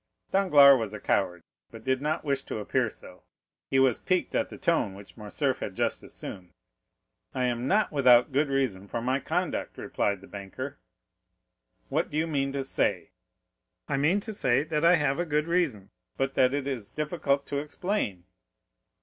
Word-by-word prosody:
Danglars 145 -9 +7
was 110 -2 -4
a - - -7
coward, 90 -4 0 0.3
but - - -12
did 130 0 0
not 150 +2 -1
wish 140 -2 0
to - - -4
appear 105 - 0
so; - - -13 0.5
he 135 - +1
was 130 -3 +4
piqued 185 -2 0
at - - 0
the - - -9
tone 135 - +1
which 100 0 -13
Morcerf 125 +5 -2
had 95 - -5
just - - -1
assumed. 90 -2 -9 0.8
"I 130 - 0
am 120 0 -1
not 210 +6 +2
without 125 -5 +6
a - - -25
good 145 +3 +2
reason 125 -9 -1
for 115 - -3
my 130 +3 0
conduct," - - -2
replied 100 -2 -1
the 95 - -13
banker. 130 +8 -7 1.1
"What - - 0
do 150 - -4
you 160 - +2
mean 140 -4 -1
to 140 -1 -2
say?" 135 - -1 0.8
"I 140 - 0
mean 160 +8 +3
to 220 +1 -6
say 130 -7 +2
that 155 0 -2
I 170 +2 +7
have 150 -2 0
a - - +2
good 150 -2 0
reason, 160 - 0 0.3
but 135 0 -1
that 130 -1 +4
it 140 -1 -2
is 125 -7 -4
difficult 150 -3 -1
to 140 - -2
explain." 150 - -3
135 Hz, 185 wpm, -28 LUFS, 115-150 Hz, 1.1 s, Danglars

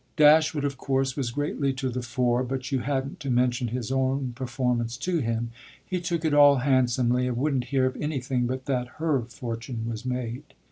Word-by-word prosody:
Dashwood 155 -1 +5
of 140 -1 -2
course 135 -1 0
was 135 -4 -1
greatly 140 +1 -1
to 135 0 -3
the 125 +1 -3
fore, 125 0 +1
but 130 +2 -4
you 135 - +1
hadn't 135 +5 -2
to 140 -3 -5
mention 125 0 +2
his 120 +1 -3
own 130 -1 0
performance 120 -2 -1
to 170 +6 -1
him: 115 -2 -2 0.3
he 180 -1 -2
took 170 -2 -2
it 155 - +2
all 145 -1 +7
handsomely 125 -1 +2
and 125 -2 -2
wouldn't 135 -2 0
hear 135 -1 +1
of 130 - -1
anything 130 -4 -1
but 130 +1 -4
that 125 -3 -1
her 155 -5 +1
fortune 115 0 -5
was 115 -1 -4
made. 125 +2 -4
130 Hz, 190 wpm, -26 LUFS, 120-140 Hz, 0.3 s, all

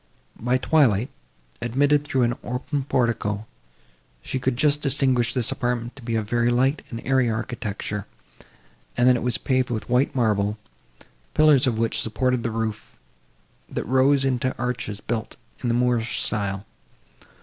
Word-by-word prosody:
By 125 +3 +1
the 130 - -8
twilight, 130 -6 +3 0.5
admitted 145 +4 +2
through 135 -3 0
an 120 0 +2
open 130 +3 -3
portico, 110 -5 0 0.8
she 130 - -3
could 125 -1 -1
just 145 +1 +2
distinguish 130 -4 +2
this 125 -4 +1
apartment 120 -1 -2
to 135 - -12
be 115 -1 -3
of 110 -2 -1
very 120 +1 +2
light 130 +5 +2
and 115 -1 -6
airy 130 -2 +3
architecture, 110 -3 -4 0.9
and 120 +1 +4
that 125 - +6
it 120 - -2
was 125 0 0
paved 130 -1 0
with 115 -1 -4
white 125 +3 +2
marble, 105 -3 +1 0.8
pillars 150 -4 +5
of 120 -3 0
which 115 0 +1
supported 125 +2 0
the 115 - -1
roof, 110 -1 -4 0.7
that - - -4
rose 135 +2 +3
into 130 0 0
arches 120 -4 -3
built 110 -2 -4 0.3
in 125 - -2
the 115 - +2
Moorish 120 -1 +1
style. 100 -1 -1
120 Hz, 155 wpm, -24 LUFS, 115-130 Hz, 0.9 s, that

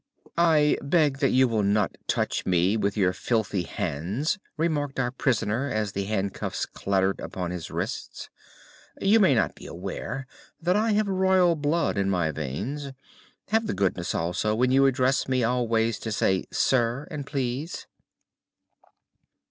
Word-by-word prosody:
"I 155 -3 +4
beg 145 -2 +2
that 135 - +3
you 130 0 +4
will 115 -3 0
not 100 -1 +1
touch - - 0
me 90 +3 +2
with 100 -1 -1
your 95 -3 +3
filthy 110 -4 -1
hands," 100 - -2 0.2
remarked 150 -4 -1
our 125 -1 0
prisoner 125 0 0
as 110 -4 -1
the 100 +1 -3
handcuffs 100 -1 -2
clattered 95 0 0
upon 90 -2 -4
his 90 -3 -5
wrists. - - -5 0.7
"You 205 +3 +4
may 185 -10 +5
not 115 - +1
be - - -12
aware 100 +8 -5 0.3
that 175 +2 +1
I 215 +1 +2
have 210 0 +2
royal 190 -2 +3
blood 150 -5 0
in 100 0 +1
my 85 -4 +1
veins. 100 - -4 0.6
Have 220 +1 +1
the - - -2
goodness, 95 -2 -1
also, 90 +6 0
when 125 +3 +2
you 135 +1 +5
address 130 0 +1
me 130 -2 +1
always 115 -2 +1
to 110 - -5
say 95 -3 +1
'sir' 125 +2 +1
and 150 -2 -4
'please. 135 +3 -3
120 Hz, 150 wpm, -26 LUFS, 100-145 Hz, 0.7 s, may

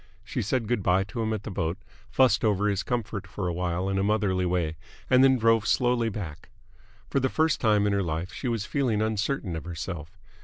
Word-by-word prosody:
She - - -3
said 115 +2 -1
good 120 -2 0
bye 90 +1 +3
to 115 +4 -5
him 110 0 -1
at 110 -2 -3
the 110 - -6
boat, 85 -1 -2 0.3
fussed 115 -1 +3
over 105 -2 +2
his 100 -2 +1
comfort 110 -4 -3
for 95 -3 -4
awhile 90 +1 -1
in 95 0 0
a - - +1
motherly 100 -3 +1
way, 85 -3 0 0.4
and 130 0 +7
then 130 -1 +5
drove 115 -2 +3
slowly 120 -2 +2
back. 95 -8 -7 0.6
For 140 - +2
the 130 0 +1
first 160 +2 +1
time 105 -3 +3
in 105 - +2
her 100 - +1
life 85 +1 -3
she 130 - -4
was 115 -3 -1
feeling 120 -7 0
uncertain 110 -3 -1
of 80 - -6
herself. 85 -2 -6
105 Hz, 215 wpm, -27 LUFS, 90-115 Hz, 0.6 s, and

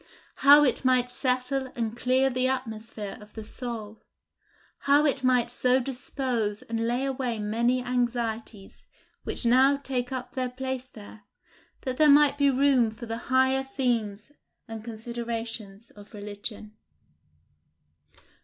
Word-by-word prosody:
how 290 +2 +8
it 260 -3 +1
might 250 -1 +2
settle 255 +1 -1
and 230 -1 -2
clear 255 +2 +2
the 255 0 0
atmosphere 225 -5 -4
of 210 0 -14
the 220 - -7
soul! 220 -2 -6 0.8
how 285 +2 +4
it 275 -2 0
might 250 -2 +2
so 255 +1 +2
dispose 245 -4 -3
and 230 0 -2
lay 245 +3 0
away 260 -4 -2
many 235 +4 0
anxieties 235 -4 -3 0.4
which - - -3
now 260 +4 +5
take 260 -3 -3
up 255 -1 -5
their 255 -2 -2
place 260 0 -5
there, 215 -3 -13 0.6
that 255 -2 -4
there 305 -1 +5
might 290 0 +6
be 285 -1 +3
room 265 -3 +3
for 220 +2 -9
the 225 0 -4
higher 260 +1 +3
themes 240 -5 -2 0.4
and 225 -1 -7
considerations 230 -2 -6
of 205 +2 -15
religion! 210 +1 -7
245 Hz, 135 wpm, -27 LUFS, 225-260 Hz, 0.8 s, how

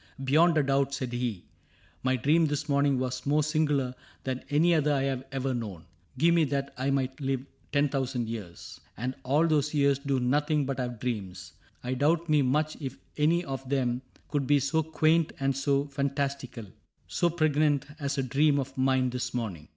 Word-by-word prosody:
" 135 - -9
Beyond 160 +5 +4
a 150 - +4
doubt," 140 0 +1
said 130 -3 -4
he, 120 -7 -3 0.3
" - - -32
My 130 0 +2
dream 155 +6 +3
this 145 +1 -2
morning 140 -1 +2
was 130 0 -2
more 150 +1 +3
singular 150 -4 +1 0.3
Than 130 -1 -3
any 160 +4 +4
other 150 -2 +2
I 140 -2 +1
have 135 -1 -1
ever 135 0 -1
known. 105 -9 -5 0.3
Give 170 +5 +4
me 170 -1 +4
that 140 0 -2
I 130 +2 -1
might 135 0 -1
live 135 -1 -1 0.3
ten 145 0 +3
thousand 130 -4 -2
years. 105 -7 -8 0.2
And 125 +4 -2
all 145 +5 +2
those 150 -2 +1
years 140 -1 +3
do 140 -2 0
nothing 145 +3 +1
but 135 0 -3
have 120 -2 -3
dreams, 95 -8 -4 0.3
I 125 +1 -2
doubt 160 +5 +1
me 150 -1 +4
much 150 +4 +1
if 135 -2 -5 0.2
any 165 +4 +2
one 135 - -4
of 135 -1 -6
them 125 -3 0 0.3
Could 145 -3 -1
be 145 0 +4
so 140 +4 +1
quaint 160 +1 +2
or 135 0 +1
so 140 +1 +1
fantastical. 140 -4 -3 0.4
So 175 - +1
pregnant, 155 -3 +2
as 140 -1 -2
a 135 - +1
dream 145 +3 +3
of 135 -1 -3
mine 130 -1 +2
this 125 -1 -3
morning. 95 -11 -4
140 Hz, 195 wpm, -28 LUFS, 130-150 Hz, 0.4 s, Beyond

